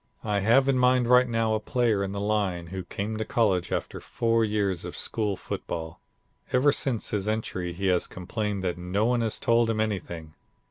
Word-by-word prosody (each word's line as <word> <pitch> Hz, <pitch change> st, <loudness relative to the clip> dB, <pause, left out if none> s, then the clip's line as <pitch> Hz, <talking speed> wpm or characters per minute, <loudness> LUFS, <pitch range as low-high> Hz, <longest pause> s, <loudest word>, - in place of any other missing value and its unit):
"I 105 Hz, -2 st, 0 dB
have 120 Hz, +7 st, +4 dB
in 135 Hz, -2 st, +3 dB
mind 125 Hz, -1 st, +4 dB
right 125 Hz, 0 st, +5 dB
now 115 Hz, -1 st, +1 dB
a 110 Hz, -, +1 dB
player 115 Hz, -3 st, +1 dB
in 95 Hz, -, -3 dB
the 100 Hz, -, -4 dB
line, 100 Hz, -4 st, 0 dB
who 95 Hz, -1 st, -4 dB
came 105 Hz, +4 st, -4 dB
to 110 Hz, -, -1 dB
college 100 Hz, -6 st, +1 dB
after -, -, -3 dB
four 115 Hz, -1 st, +1 dB
years 105 Hz, -4 st, 0 dB
of -, -, -6 dB
school 105 Hz, -3 st, -1 dB
football. 80 Hz, -2 st, -6 dB, 0.5 s
Ever 135 Hz, +3 st, +4 dB
since 130 Hz, -5 st, -1 dB
his 105 Hz, -1 st, -1 dB
entry 100 Hz, -5 st, -2 dB
he 95 Hz, +3 st, -5 dB
has 90 Hz, -2 st, +2 dB
complained 100 Hz, +2 st, -3 dB
that 90 Hz, -1 st, -2 dB
no 90 Hz, +5 st, 0 dB
one 120 Hz, 0 st, +2 dB
has 110 Hz, -1 st, -1 dB
told 115 Hz, 0 st, +2 dB
him 110 Hz, -1 st, 0 dB
anything. 85 Hz, -7 st, -3 dB
105 Hz, 195 wpm, -27 LUFS, 95-115 Hz, 0.5 s, right